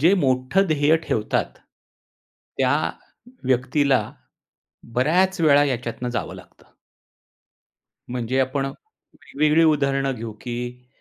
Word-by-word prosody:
जे 175 +7 +5
मोठं 130 +9 +2
ध्येय 155 0 +3
ठेवतात, 110 -1 -1 1.1
त्या 130 +1 +3 0.7
व्यक्तीला 130 0 +2 0.9
बऱ्याच 175 +8 +2
वेळा 145 -2 +5
याच्यातून 120 -2 -3
जावं 120 - -4
लागतं. - - -18 1.4
म्हणजे 125 +1 -1
आपण 135 +1 0
वेगवेगळी 155 - -2
उदाहरणं 140 -3 +2
घेऊ, 115 -1 -6
की 125 0 -6
135 Hz, 95 wpm, -23 LUFS, 125-150 Hz, 1.4 s, जे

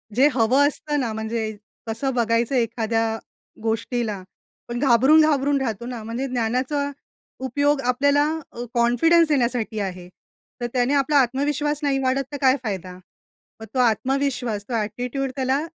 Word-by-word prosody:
जे 270 +3 +6
हवं 255 +4 +4
असतं 295 0 -2
ना, 240 -4 -1
म्हणजे 220 0 -3 0.4
कसं 230 +5 -2
बघायचं 235 +1 +1
एखाद्या 225 -1 0 0.5
गोष्टीला. 225 -2 -2 0.4
पण 240 0 -4
घाबरून-घाबरून 280 +2 +4
राहतो 230 -3 -3
ना. 245 -2 -5
म्हणजे 235 +5 -3
ज्ञानाचा 255 +4 -1 0.5
उपयोग 285 +2 +1
आपल्याला 280 +4 +2 0.3
अ, 240 - -6
कॉन्फिडन्स 255 +8 +4
देण्यासाठी 240 -5 0
आहे. 185 -3 -4 0.5
तर 240 - -1
त्याने 250 +2 +2
आपला 285 +1 +3
आत्मविश्वास 285 +3 0
नाही 275 -2 +1
वाढत, 260 +1 +1
तर 290 - -4
काय 260 -1 +5
फायदा? 185 -5 -4 0.7
मग - - -6
तो 260 - -1
आत्मविश्वास, 245 -2 0
तो - - -4
ॲटिट्यूड 245 +5 -2
त्याला 265 0 +1
250 Hz, 135 wpm, -23 LUFS, 225-275 Hz, 0.7 s, जे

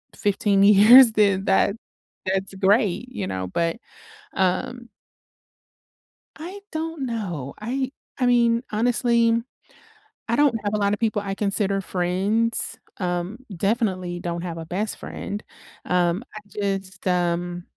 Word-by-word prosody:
15 200 -1 +1
years, 220 +5 +8
then 200 -3 +2
that 200 +1 +3 0.5
that's 190 +1 -1
great, 205 +4 +2
you 215 -7 -4
know, 95 0 -3
but, 165 - -1 0.6
um 190 +6 -1 1.5
I 360 +6 -8
don't 320 -3 -3
know. 175 - -4
I 260 +5 -2 0.3
I 255 - +1
mean, 235 -1 +3
honestly, 235 +1 +2 1.0
I 235 - +1
don't 290 -4 +4
have 205 +1 -1
a - - +2
lot 200 0 +1
of - - -6
people 215 -2 0
I 195 -1 -3
consider 200 -1 0
friends. 195 +6 -1 0.2
Um, 180 +3 -2 0.2
definitely 185 -4 -1
don't 170 0 -4
have 170 -2 -5
a 165 - -6
best 200 +5 -3
friend. 205 +1 -6 0.4
Um, 180 +3 +1
I 215 - -7
just, 195 -2 -4
um 175 0 0
200 Hz, 130 wpm, -23 LUFS, 180-230 Hz, 1.5 s, years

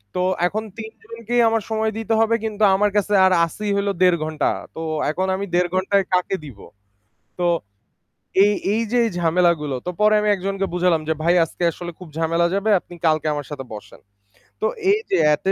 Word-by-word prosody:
তো 180 - 0 0.3
এখন 215 +4 -3 0.2
৩ 220 0 -7
জনকেই 230 +1 -2
আমার 225 -1 0
সময় 220 0 0
দিতে 225 0 -2
হবে 225 +1 +3
কিন্তু 215 -1 -2
আমার 205 +1 +2
কাছে 205 0 0
আর 190 - +4
আসি 210 +6 -6
হল 200 0 -1
1.5 180 -2 +5
ঘন্টা। 155 -1 -1 0.3
তো 160 - -6 0.3
এখন 185 +4 -2
আমি 200 - -3
1.5 175 0 +2
ঘন্টায় 195 +1 +1
কাকে 180 +1 +1
দিব। 125 -9 -12 0.8
তো 175 - 0 1.0
এই, 205 - +3 0.2
এই 225 - +1
যে 245 - +2
এই - - 0
ঝামেলাগুলো 165 -4 +1
তো - - -2
পরে 215 0 +5
আমি 210 - +1
একজনকে 195 +1 -2
বুঝালাম 175 -2 +2
যে - - +3
ভাই 170 +2 +3
আজকে 165 +2 -5
আসলে 175 +1 -7
খুব 180 - -10
ঝামেলা 165 +1 +1
যাবে 200 +2 0
আপনি 175 - -14
কালকে 155 -1 +2
আমার 145 -1 -4
সাথে 145 -3 -6
বসেন। 105 - -11 0.6
তো - - +1 0.3
এই 420 - +3
যে - - +2 0.2
এটি 190 +6 -1
185 Hz, 195 wpm, -21 LUFS, 170-215 Hz, 1.0 s, 1.5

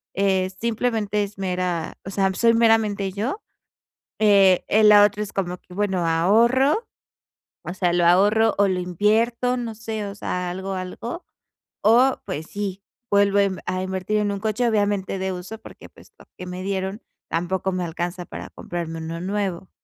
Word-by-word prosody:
eh, 190 -1 +1
simplemente 220 -3 0
es 200 0 -8
mera 180 -3 -2
o - - -5
sea, 195 -1 +1
soy 230 -1 +4
meramente 220 -4 +2
yo, 230 - -3 0.8
eh, 195 -4 +5
e 215 +1 +3
la 210 -1 +8
otra 210 +1 -1
es 210 - -8
como 180 -2 -2
que 180 - -17
bueno, 190 -4 0
ahorro, 235 - +3 0.8
o 175 - -6
sea, 180 -2 +1
lo 175 -1 +2
ahorro, 205 +5 +4
o 205 - +5
lo 185 -1 0
invierto, 225 +7 +1
no 230 -2 -4
sé, 220 -1 -4
o 200 - -7
sea, 180 -2 -3
algo 190 +2 -5
algo, 190 - -6 0.6
o 245 +5 +5
pues 155 - -5
sí, 200 -1 -5 0.3
vuelvo 200 0 +4
a 200 - +5
inv 190 -3 -3
a 185 0 -2
invertir 190 +3 -2
en 205 -1 0
un 200 - -3
coche, 220 +3 0
obviamente 205 -3 0
de 190 0 -2
uso, 180 +5 -7
porque - - -13
pues - - -19
lo - - -16
que 180 - -7
me 180 +1 -6
dieron 195 +1 -3 0.3
tampoco 180 +3 -1
me 185 -1 -2
alcanza 175 +2 -4
para - - -8
comprarme 170 -2 -6
uno 165 +1 -5
nuevo. 190 -1 -3
200 Hz, 175 wpm, -23 LUFS, 185-215 Hz, 0.8 s, la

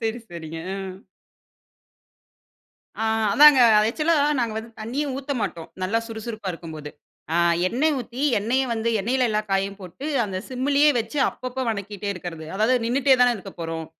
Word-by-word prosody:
சரி, 225 +1 -2
சரிங்க. 165 -1 -7 0.3
ம். 190 0 -8 2.0
அ - - -2 0.3
அதாங்க 295 +2 +8 0.3
ஆக்சுவலா 310 +7 +1 0.2
நாங்க 235 -3 0
வந்து 230 +1 -8
தண்ணியே 255 +7 -2
ஊத்த 280 +1 -4
மாட்டோம் 170 -5 -4
நல்லா 210 +5 +1
சுறுசுறுப்பா 220 -2 -6
இருக்கும்போது. 155 -3 -8 0.4
அ - - 0 0.3
எண்ணெய் 300 +7 +1
ஊத்தி 245 +2 -6 0.2
எண்ணெய 240 +6 +1
வந்து 225 0 -1
எண்ணெயில 250 +5 +1
எல்லா 215 0 +1
காயையும் 195 +1 0
போட்டு 185 - -8 0.2
அந்த 190 -2 -5
சிம்மிலயே 280 +3 +2
வச்சு 280 +6 -3
அப்பப்போ 255 +1 -5
வணக்கிட்டே 205 -1 -5
இருக்கறது. 165 -3 -7
அதாவது 220 +5 +2
நின்னுட்டே 265 +3 +3
தானே 245 -1 +5
இருக்கப் 195 -2 -11
போறோம். 165 -1 -4
225 Hz, 145 wpm, -23 LUFS, 190-255 Hz, 2.0 s, அதாங்க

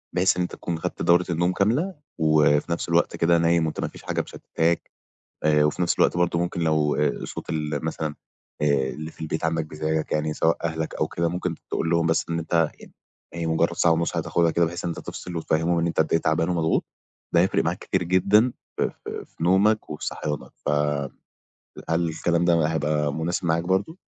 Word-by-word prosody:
بحيث 90 +1 +3
إن - - +1
أنت 90 - -2
تكون 85 -2 -4
خدت - - -4
دورة 85 +1 +4
النوم 85 +2 +1
كاملة. 130 - +1 0.2
وفي 75 -1 +3
نفس 85 - -2
الوقت 85 0 +2
كده، 85 +1 +3
نايم 85 0 +3
وأنت 80 - -4
ما - - -1
فيش - - -12
حاجة - - -1
مشتِّتاك. 85 +1 -2 0.5
آآ، 75 -1 +4
وفي 75 +4 0
نفس 85 - +1
الوقت - - +3
برضه، 85 -1 +1
ممكن، 85 0 -2
لو 75 -2 +2
آآ 75 -1 0
صوت - - -7
ال 75 0 -2
مثلًا، 80 -1 -3 0.5
آآ، - - +3 0.2
اللي 80 +1 -6
في - - -21
البيت 80 0 -3
عندك، 80 -1 0
بيضايقك 80 0 -2
يعني، 75 0 0
سواء 80 +2 +2
أهلك 80 -1 -2
أو - - 0
كده، 85 0 -1
ممكن 90 0 -2 0.2
تقول 80 - -1
لهم، 85 -1 +2
بس، 80 0 +2
إن 85 - 0
أنت 80 -1 +1
يعني - - -14 0.4
هي 85 -1 -3
مجرَّد 80 +1 +2
ساعة 85 - +4
ونص 85 +1 0
هتاخدها 85 -1 +1
كده، 85 +1 +2
بحيث 85 +2 -4
إن 85 - -1
أنت 85 - -5
تفصل، 90 -1 -7
وتفهِّمهم 85 +1 +1
أنت 85 - -3
قد 80 - +1
إيه 80 - +5
تعبان 80 +2 +1
ومضغوط. 85 -2 +1 0.5
ده 85 - +6
هيفرِق 95 - +2
معاك - - -1
كتير - - -1
جدًا 100 +7 +3 0.2
في - - +1
في - - -5
في 80 - -7
نومك 100 +5 +3
وصحيانك. 75 -1 -4
ف - - +2 1.2
هل 85 +1 +1
الكلام 85 +2 0
ده 85 -3 +3
هيبقى 75 -2 0
مناسب 85 +2 -2
معاك 85 +1 +1
برضه؟ 95 - 0
85 Hz, 200 wpm, -24 LUFS, 80-85 Hz, 1.2 s, ده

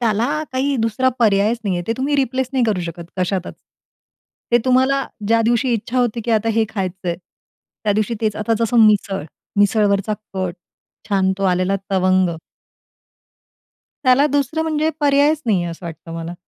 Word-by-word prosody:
त्याला 225 -1 +1 0.3
काही 270 +2 0
दुसरा 230 +2 +1
पर्यायच 215 +1 +3
नाही 195 -3 0
आहे. 175 - -2
ते 225 - +1
तुम्ही 280 +3 0
रिप्लेस 260 -1 0
नाही 260 -3 +2
करू 210 -5 0
शकत, 170 0 -6
कशातच. 185 0 -2 1.0
ते 240 - +6
तुम्हाला 260 +2 +3 0.2
ज्या 230 0 +4
दिवशी 240 +2 +2
इच्छा 230 +3 -2
होती 240 -1 0
की 235 - -2
आता 225 0 +2
हे 225 0 +3
खायचं 185 -3 -4
आहे, 170 - -1 0.7
त्या 205 - +3
दिवशी 215 +2 0
तेच. 215 -2 0
आता 215 +2 0
जसं 235 +1 +1
मिसळ, 200 -3 +1 0.4
मिसळवरचा 205 0 +2 0.2
कट, 185 -2 -2 0.5
छान 190 -2 +2
तो 195 - -1
आलेला 185 +2 +1
तवंग. 185 -1 +3 1.8
त्याला 260 +3 +5
दुसरं 290 +2 0
म्हणजे 315 0 0
पर्यायच 290 +2 +3
नाही 195 -5 +2
आहे 170 - -3
असं 170 +1 -8
वाटतं 165 0 -9
मला. 165 +1 -5
220 Hz, 165 wpm, -19 LUFS, 190-255 Hz, 1.8 s, ते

